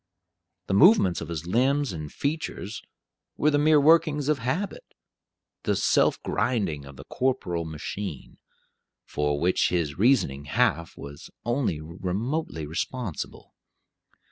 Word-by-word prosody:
The - - -2
movements 120 - +5
of 80 - -5
his 85 -1 -5
limbs 130 +6 +1
and 75 -3 -6
features 140 -7 -3 0.6
were 150 - +3
the 145 - +2
mere 155 0 +5
workings 150 -1 +4
of 150 -3 +2
habit 180 - -2 0.8
the - - 0
self - - +3
grinding 90 - -1
of 70 0 -11
the 65 - -10
corporeal 90 - -1
machine 80 +1 -6 0.7
for 75 0 -1
which 90 +3 +2
his 85 -4 -1
reasoning 95 - +2
half 80 +2 0
was 70 0 -10 0.2
only 120 - 0
remotely 90 - -3
responsible. 95 - -5
95 Hz, 120 wpm, -26 LUFS, -, 0.8 s, movements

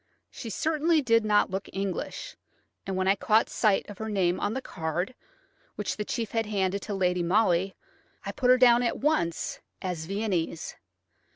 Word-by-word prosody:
She 230 - -7
certainly 315 - +1
did 230 -2 +4
not 210 -3 +3
look 190 +1 -4
English, 195 - -4 0.5
and 190 - -2
when 185 0 0
I 195 - +6
caught 220 +2 +2
sight 210 -3 +2
of 205 - -10
her 220 0 -4
name 185 -4 +1
on 210 - -1
the - - 0
card, 175 +6 -3 0.6
which - - -2
the 210 - -3
chief 225 +1 -3
had 225 -1 0
handed 200 -1 0
to 205 - -4
Lady 180 -2 +1
Molly, 185 0 +2 0.5
I - - -2
put 250 - 0
her 255 - +7
down 245 -1 +6
at 240 - 0
once 175 - 0 0.2
as 180 -4 -4
Viennese. 190 -5 -2
205 Hz, 175 wpm, -28 LUFS, 185-230 Hz, 0.6 s, her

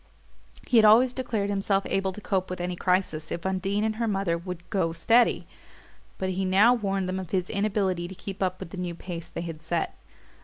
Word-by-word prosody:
He 245 - +3
had 220 - +7
always 235 +4 +6
declared 220 -6 -2
himself 195 0 +1
able 195 0 0
to 190 - -9
cope 190 -2 -1
with 185 - -5
any 175 0 -2
crisis 180 -4 0
if 170 - -4
Undine 190 +2 0
and 220 0 -1
her 230 0 0
mother 195 -5 0
would 175 0 -7
"go 170 -5 +1
steady"; 230 +8 +3 0.7
but 190 - -2
he 190 +1 -1
now 195 +6 +5
warned 195 -5 -1
them 185 +1 -2
of 185 -3 -7
his 185 -1 -1
inability 195 -4 0
to 190 - -9
keep 195 +1 -8
up 185 -1 0
with 165 - -8
the - - -7
new 175 -1 -3
pace 170 -1 -7
they 170 - -6
had 165 -2 -6
set. 165 +1 -2
190 Hz, 215 wpm, -27 LUFS, 175-205 Hz, 0.7 s, had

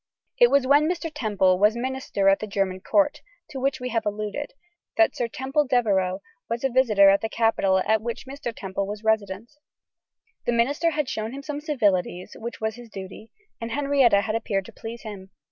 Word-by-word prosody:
It 485 -1 +7
was 280 -2 +3
when 290 +4 +4
Mr. 340 -2 -3
Temple 200 -9 +2
was 210 +2 +4
minister 255 -5 -2
at 195 0 +5
the 215 - -5
German 195 -2 -1
Court, 295 +8 +1 0.3
to 270 - -5
which 275 +1 0
we 250 0 -4
have 225 -2 -1
alluded, 210 +6 -4 0.5
that 335 - +4
Sir 240 - -1
Temple 265 +5 -1
Devereux 195 -7 +1 0.3
was 230 +2 -3
a 270 - +2
visitor 215 -6 +5
at 200 - +2
the 225 - -2
capital 220 -4 +2
at 220 0 +2
which 235 +3 -5
Mr. 270 -2 -5
Temple 195 -2 -4
was 210 +1 -6
Resident. 220 0 -1 1.0
The 240 - +2
minister 285 +8 +2
had 300 -3 -1
shown 220 -2 -4
him 280 +1 -7
some 295 0 -5
civilities, 205 - 0
which 235 +1 -6
was 220 +1 -2
his 240 -1 -12
duty; 195 +2 -9 0.3
and 230 - -4
Henrietta 275 -7 +3
had 215 +1 -3
appeared 205 -4 -1
to - - -12
please 230 +1 -8
him. 200 -4 -8
225 Hz, 195 wpm, -25 LUFS, 200-270 Hz, 1.0 s, It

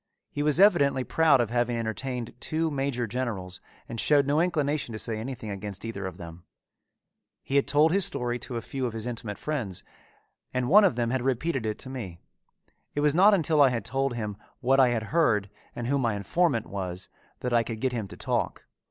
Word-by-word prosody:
He 145 - -3
was 150 +2 +2
evidently 145 -10 +5
proud 160 -1 +4
of 115 -2 -2
having 120 0 +1
entertained 115 +2 -3
two 160 +3 -1
major 135 -3 -1
generals 105 -6 -4 0.3
and 115 - -5
showed 145 +2 +4
no 145 +3 +2
inclination 150 -7 0
to - - -4
say 110 0 -2
anything 115 -2 -5
against 100 +1 -5
either 100 -4 -4
of 90 -2 -8
them. 85 0 -10 1.0
He 135 - -3
had 140 - +3
told 150 +2 +4
his 195 +2 +3
story 125 -9 -2
to 120 - -4
a 115 - -5
few 130 -2 -3
of 115 - -6
his 110 0 -4
intimate 115 -4 -4
friends 120 - -4 0.7
and 125 -1 0
one 200 +8 +7
of 185 - +2
them 120 -1 0
had 130 -1 0
repeated 135 -1 -1
it 105 - -2
to 130 - -9
me. 95 -10 -6 0.8
It 145 - 0
was 150 -1 +4
not 200 +5 +6
until 155 -4 +2
I 140 - +7
had 115 -4 -3
told 135 0 -1
him 105 -3 -4 0.2
what 135 +1 +3
I 130 - +7
had 115 -2 -1
heard 110 - +2 0.2
and 120 - -4
who 140 +3 +1
my 115 -5 +1
informant 120 - +1
was 95 -2 -5 0.3
that 125 -1 -2
I 120 - +5
could 115 -1 -5
get 130 +2 0
him 110 -4 -3
to - - -11
talk. - - -2
125 Hz, 210 wpm, -27 LUFS, 110-145 Hz, 1.0 s, one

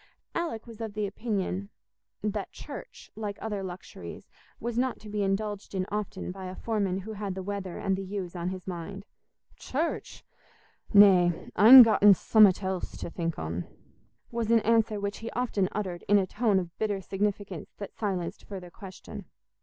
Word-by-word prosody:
Alick 330 -10 -3
was 230 -2 -11
of 215 -2 -5
opinion 200 -2 -2 0.5
that 210 -1 -2
church, - - -10
like 210 -2 -4
other 210 -3 -3
luxuries, 185 -1 -8 0.3
was 240 -1 -3
not 255 +1 0
to 215 - -10
be 210 0 -2
indulged 200 +1 -2
in 185 -1 0
often 205 -3 -3
by 190 0 -8
a 185 - -7
foreman 200 -4 -1
who 220 +3 -7
had 200 -2 -4
the 190 - -5
weather 195 -2 -4
and 195 -1 0
the 195 - -4
ewes 190 -2 -5
on 175 0 -2
his 185 -1 -6
mind. 190 +2 -6 0.5
"Church! 315 +6 -3 0.7
Nay—I'n 200 +4 +8
gotten 205 -3 +6
summat 205 -1 +5
else 190 -1 -3
to - - -6
think 165 -2 -3
on," 85 +2 -4 0.6
was 230 -2 -2
an 230 -1 +5
answer 225 -1 +2
which 200 0 -3
he 225 - -5
often 220 -6 0
uttered 185 -4 -4
in 205 - +6
a 195 - +2
tone 210 0 +1
of 175 -3 -3
bitter 210 -2 0
significance 195 -2 -3
that 200 - -7
silenced 190 -5 -3
further 185 -3 -8
question. 190 -1 -10
200 Hz, 165 wpm, -28 LUFS, 185-215 Hz, 0.7 s, Nay—I'n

